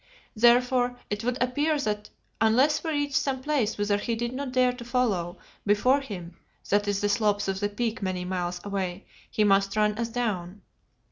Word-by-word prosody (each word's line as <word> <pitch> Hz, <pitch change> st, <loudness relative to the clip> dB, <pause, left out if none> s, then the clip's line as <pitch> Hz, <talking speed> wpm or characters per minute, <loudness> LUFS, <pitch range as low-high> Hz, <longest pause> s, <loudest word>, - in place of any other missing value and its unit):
Therefore 245 Hz, +2 st, +4 dB
it 205 Hz, +2 st, -2 dB
would 250 Hz, +1 st, 0 dB
appear 290 Hz, +5 st, +1 dB
that 210 Hz, -5 st, -2 dB, 0.3 s
unless 260 Hz, +7 st, +3 dB
we 325 Hz, -, -2 dB
reached 290 Hz, -2 st, -1 dB
some 265 Hz, -1 st, 0 dB
place 280 Hz, -7 st, 0 dB
whither 205 Hz, 0 st, +1 dB
he 230 Hz, +2 st, -2 dB
did 235 Hz, +2 st, -3 dB
not 270 Hz, 0 st, -4 dB
dare 255 Hz, -1 st, +3 dB
to 250 Hz, -1 st, -9 dB
follow, 215 Hz, -8 st, 0 dB, 0.3 s
before 250 Hz, +7 st, +3 dB
him 180 Hz, -9 st, -8 dB, 0.3 s
that 205 Hz, +1 st, +3 dB
is 200 Hz, -1 st, 0 dB
the 205 Hz, -, +2 dB
slopes 205 Hz, -1 st, +1 dB
of 195 Hz, 0 st, -1 dB
the 205 Hz, 0 st, 0 dB
Peak 225 Hz, +2 st, -2 dB
many 185 Hz, -2 st, -2 dB
miles 180 Hz, -1 st, -2 dB
away, 195 Hz, -2 st, -3 dB, 0.2 s
he 215 Hz, -, +1 dB
must 195 Hz, 0 st, +3 dB
run 210 Hz, 0 st, +3 dB
us 235 Hz, 0 st, -1 dB
down. 205 Hz, -6 st, -3 dB
215 Hz, 185 wpm, -27 LUFS, 200-250 Hz, 0.3 s, Therefore